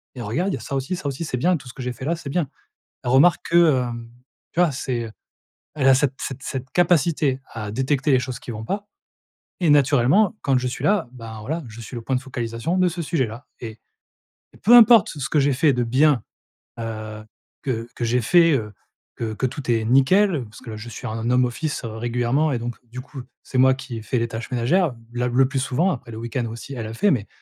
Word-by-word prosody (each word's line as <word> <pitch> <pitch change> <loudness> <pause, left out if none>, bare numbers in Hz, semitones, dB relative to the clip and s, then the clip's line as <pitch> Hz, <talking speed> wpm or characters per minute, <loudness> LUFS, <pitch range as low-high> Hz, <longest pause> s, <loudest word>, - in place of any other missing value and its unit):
et 125 - -6
regarde, 160 - -1
il - - -1
y - - -4
a - - -11
ça 140 - -5
aussi. 135 +7 -2
Ça 160 - -9
aussi, 140 +4 -3
c'est 125 - -3
bien 180 +8 +2
tout 135 - -14
ce - - -9
que 130 - -7
j'ai 125 0 -3
fait 130 +3 -8
là, 170 +2 +1
c'est 150 -4 -8
bien». 155 -2 -1 0.5
Elle 120 - -2
remarque 155 +7 +5
que, 165 -6 +5
hem, 120 -1 -5 0.4
tu 170 - -2
vois? 170 -4 +3
C'est, 125 -3 -3
heu, 110 - -8 0.6
elle 135 -3 +2
a 130 - +7
cette 140 -1 +1
cette 135 0 -5
cette 130 -1 -5
capacité 160 -6 +2
à 105 -3 -5
détecter 135 +4 0
les 130 - +5
choses 130 -1 -5
qui 120 - -8
vont 110 0 -6
pas, 205 - -3 0.7
et 170 -4 +2
naturellement 145 - +4
quand 135 -2 +2
je 125 - -2
suis 125 - -5
là, 200 -10 +2
ben, 115 -3 -9
voilà 160 +9 -3
je 115 +1 -11
suis 120 - -9
le 120 - -5
point 130 +3 -1
de 125 - -1
focalisation 120 +5 -3
de 180 - +4
ce 170 0 -3
sujet-là. 130 -5 -2
Et 110 -2 -8 0.7
et - - -17
peu 230 +4 +6
importe 230 -3 +8
ce 150 - -8
ce - - -2
que 150 - +2
j'ai 140 0 +3
fait 145 +3 +3
de 125 0 0
bien, 130 0 +3 0.6
heu, 110 -1 -6 0.4
que 115 -3 -2
que 120 - -4
j'ai 125 +2 +2
fait, 165 +7 +5
heu, 105 -5 -2 0.4
que 110 -2 -3
que 130 - -2
tout 130 0 -5
est 110 -1 +1
nickel 140 - +4
parce 110 - -14
que 115 - -9
là - - -6
je 115 +3 -8
suis 125 +3 -7
en 115 +2 -3
home 125 0 +4
office, 145 +4 -3
heu, - - -4
régulièrement 120 +6 0
et 120 - -1
donc 120 0 -5
du 125 +2 -7
coup 130 0 -9 0.2
c'est 130 - -4
moi 130 0 +6
qui 130 -3 -7
ai - - -6
fait 125 +1 -1
les 115 - 0
tâches 115 +2 -7
ménagères, 130 +6 +2 0.2
la 125 0 0
le 130 +2 +3
plus 135 -1 -2
souvent 140 +8 +1
après 120 -2 -6
le 110 - -7
week-end 120 +1 -3
aussi 115 +5 -8
elle, 115 -4 -5
elle 110 - -7
fait, 205 - +3
mais 110 -7 -1
130 Hz, 245 wpm, -22 LUFS, 115-150 Hz, 0.7 s, importe